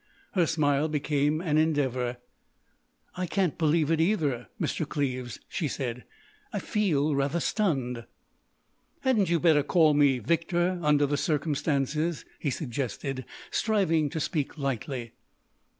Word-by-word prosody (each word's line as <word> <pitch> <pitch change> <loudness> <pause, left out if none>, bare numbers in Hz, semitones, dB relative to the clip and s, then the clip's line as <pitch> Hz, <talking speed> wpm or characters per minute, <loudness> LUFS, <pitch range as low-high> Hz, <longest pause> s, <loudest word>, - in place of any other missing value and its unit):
Her 175 -4 +2
smile 150 -2 +2
became 150 0 0
an 155 -4 +2
endeavour. 130 -6 0 1.0
"I 180 0 -2
can't 185 -4 0
believe 160 -1 +2
it 160 -1 +3
either, 155 - +1
Mr. 155 - -2
Cleves," 130 -4 -2
she 160 - -2
said. 125 -3 -4 0.5
"I - - -3
feel 155 -8 +1
rather 140 +4 0
stunned." 135 - -1 1.0
"Hadn't 225 -9 +2
you 170 -1 +3
better 155 -3 +5
call 155 +1 +4
me 145 -3 +4
Victor—under 170 - +1
the 145 +1 0
circumstances?" 150 0 0
he 145 - -1
suggested, 130 -1 -3 0.3
striving 175 -9 +2
to 160 - -3
speak 150 -1 -2
lightly. 130 -3 -3
150 Hz, 120 wpm, -28 LUFS, 140-165 Hz, 1.0 s, better